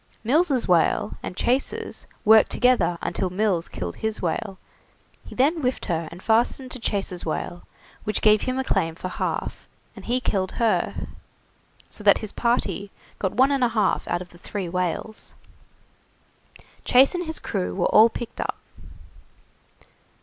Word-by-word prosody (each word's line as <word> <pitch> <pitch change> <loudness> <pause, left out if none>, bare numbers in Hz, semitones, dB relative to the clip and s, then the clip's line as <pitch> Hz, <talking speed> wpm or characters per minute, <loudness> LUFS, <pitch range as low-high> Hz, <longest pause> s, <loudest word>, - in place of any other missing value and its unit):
Mills' 275 +1 +2
whale 180 +4 +2
and 180 - -6
Chase's 255 +3 -1 0.2
worked 220 +1 +7
together 245 -8 +2
until 185 - -1
Mills 185 -2 0
killed 85 -1 -6
his 220 0 -2
whale; 190 +3 -2 0.7
he - - -11
then 285 +7 +3
whiffed 255 -1 -1
her 165 -3 -2
and 175 +2 -11
fastened 240 +3 +1
to 255 - -4
Chase's 195 -5 -2
whale, 175 +2 -4 0.4
which 215 - -2
gave 215 -1 +5
him 255 0 -2
a 265 - 0
claim 165 -9 0
for 185 - -5
half, - - -3 0.3
and - - -11
he 245 +2 +1
killed 190 -6 -1
her; 230 -2 0 0.8
so 210 - -4
that 200 -1 +6
his 215 -2 -5
party 205 -5 0 0.3
got 190 - -1
one 260 +5 +4
and 275 -2 +1
a 245 - +4
half 220 -2 +1
out 175 - -1
of 180 - -19
the 175 - -17
three 195 0 -5
whales. 180 +5 -3 1.5
Chase 265 +5 +5
and 355 -2 -3
his 320 - -3
crew 90 0 -3
were - - +1
all 220 +2 +8
picked 235 0 -6
up. - - -3
215 Hz, 155 wpm, -24 LUFS, 180-250 Hz, 1.5 s, all